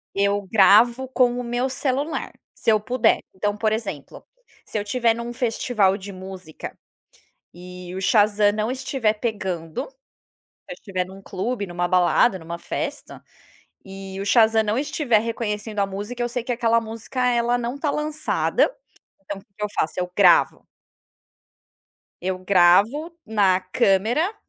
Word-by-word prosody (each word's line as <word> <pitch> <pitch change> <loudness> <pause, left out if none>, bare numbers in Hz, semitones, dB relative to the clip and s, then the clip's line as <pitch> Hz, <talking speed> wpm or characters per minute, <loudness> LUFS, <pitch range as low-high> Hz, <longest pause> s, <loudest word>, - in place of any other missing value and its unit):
eu 200 +1 +1
gravo 235 +5 +5
com 245 -1 +2
o - - -3
meu 245 +2 -1
celular, 275 +3 -2 0.2
se - - -2
eu 215 - +3
puder. 245 +3 +2 0.2
Então, 205 +2 -1
por 215 0 +1
exemplo: 195 -10 -5 0.4
se - - -4
eu - - 0
estiver 230 +2 +1
num 235 +1 -5
festival 225 -4 +1
de 200 0 -9
música 185 -3 -9 0.8
e 180 0 -10
o 190 - -4
Shazam 205 +1 +3
não 215 +2 -1
estiver 260 -4 0
pegando, 190 -8 -4
se - - -34 0.7
eu - - -6
estiver 185 -3 -3
num 190 +2 -12
clube, 205 +3 -3
numa 175 0 -2
balada, 185 +3 +3
numa 170 0 -7
festa, - - -5 0.6
e 195 0 -8
o 200 - -4
Shazam 220 0 +4
não 215 +1 -1
estiver 280 -5 +1
reconhecendo 215 -2 -3
a 200 - +3
música, 205 +5 -6
eu 240 - -1
sei 240 0 -3
que 245 - -3
aquela 230 -1 +2
música, 225 +3 -7
ela 240 0 +2
não 245 +2 -4
tá 290 +1 -1
lançada. 310 +12 0 0.5
Então 200 +1 -6
o - - -12
que 195 +2 -8
eu - - -1
faço? 160 - -1
Eu 180 0 -3
gravo. - - +4 1.6
Eu 185 +1 -1
gravo 200 - +3
na 200 -4 +2
câmera 215 - +1
215 Hz, 150 wpm, -23 LUFS, 190-245 Hz, 1.6 s, gravo